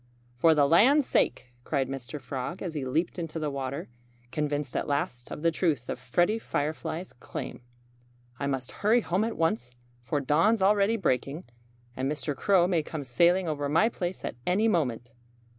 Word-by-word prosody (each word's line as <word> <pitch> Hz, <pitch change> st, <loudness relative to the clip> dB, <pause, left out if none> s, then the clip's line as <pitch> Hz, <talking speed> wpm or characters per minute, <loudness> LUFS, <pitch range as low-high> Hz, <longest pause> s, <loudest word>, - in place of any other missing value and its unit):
"For 160 Hz, +6 st, +4 dB
the 145 Hz, -2 st, +4 dB
land's 255 Hz, -, +5 dB
sake!" 125 Hz, -, 0 dB
cried 135 Hz, -2 st, 0 dB
Mr. 135 Hz, +2 st, -6 dB
Frog, 135 Hz, +6 st, -5 dB
as 175 Hz, -4 st, -4 dB
he 145 Hz, -4 st, -3 dB
leaped 165 Hz, +8 st, -1 dB
into 165 Hz, -1 st, -4 dB
the 155 Hz, -2 st, -2 dB
water, 140 Hz, +3 st, -4 dB, 0.4 s
convinced 145 Hz, -2 st, -2 dB
at -, -, -1 dB
last 135 Hz, -4 st, -2 dB
of 150 Hz, -, -7 dB
the 165 Hz, -, +4 dB
truth 155 Hz, -8 st, 0 dB
of -, -, -3 dB
Freddie 175 Hz, -, +1 dB
Firefly's 160 Hz, 0 st, -3 dB
claim. 125 Hz, -, -7 dB, 0.8 s
"I 140 Hz, -, -1 dB
must 135 Hz, -2 st, -3 dB
hurry 225 Hz, +4 st, +4 dB
home 185 Hz, +1 st, 0 dB
at 225 Hz, 0 st, -3 dB
once, 125 Hz, -7 st, 0 dB, 0.3 s
for 145 Hz, +5 st, -1 dB
dawn's 165 Hz, -, +3 dB
already 205 Hz, +3 st, +4 dB
breaking. 145 Hz, -, -1 dB, 0.5 s
And 135 Hz, +2 st, -1 dB
Mr. 150 Hz, -1 st, -3 dB
Crow 185 Hz, +3 st, +4 dB
may 175 Hz, -3 st, +2 dB
come 150 Hz, -1 st, -6 dB
sailing 170 Hz, +8 st, +3 dB
over 145 Hz, -2 st, -2 dB
my 165 Hz, +9 st, +4 dB
place 180 Hz, -5 st, -4 dB
at -, -, -5 dB
any 200 Hz, +5 st, +3 dB
moment." 125 Hz, -, 0 dB
155 Hz, 175 wpm, -28 LUFS, 135-180 Hz, 0.8 s, land's